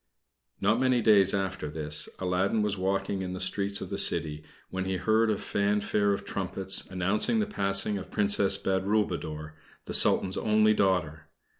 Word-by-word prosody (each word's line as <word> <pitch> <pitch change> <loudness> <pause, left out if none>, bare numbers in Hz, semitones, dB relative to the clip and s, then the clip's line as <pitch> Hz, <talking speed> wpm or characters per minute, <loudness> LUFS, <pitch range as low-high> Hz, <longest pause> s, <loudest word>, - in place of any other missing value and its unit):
Not 105 +4 +2
many 130 -1 +2
days 105 -4 +5
after 95 -6 -3
this, 75 0 -2
Aladdin 95 +4 0
was 105 -1 -1
walking 95 +1 -2
in 90 -1 -4
the 95 - -6
streets 100 +2 0
of - - -7
the - - -1
city, 75 -1 +1 0.3
when 95 0 -3
he 95 0 -2
heard 110 +4 +2
a 105 - +1
fanfare 100 0 0
of 100 - -3
trumpets 95 0 -3
announcing 95 - 0
the 215 - +1
passing 100 - 0
of 95 - -8
the - - -22
Princess 100 -1 +1
Badroulboudour, 95 -6 -2 0.3
the - - -6
Sultan's 95 -1 +2
only 110 0 +3
daughter. 90 -7 0
100 Hz, 165 wpm, -28 LUFS, 95-105 Hz, 0.3 s, days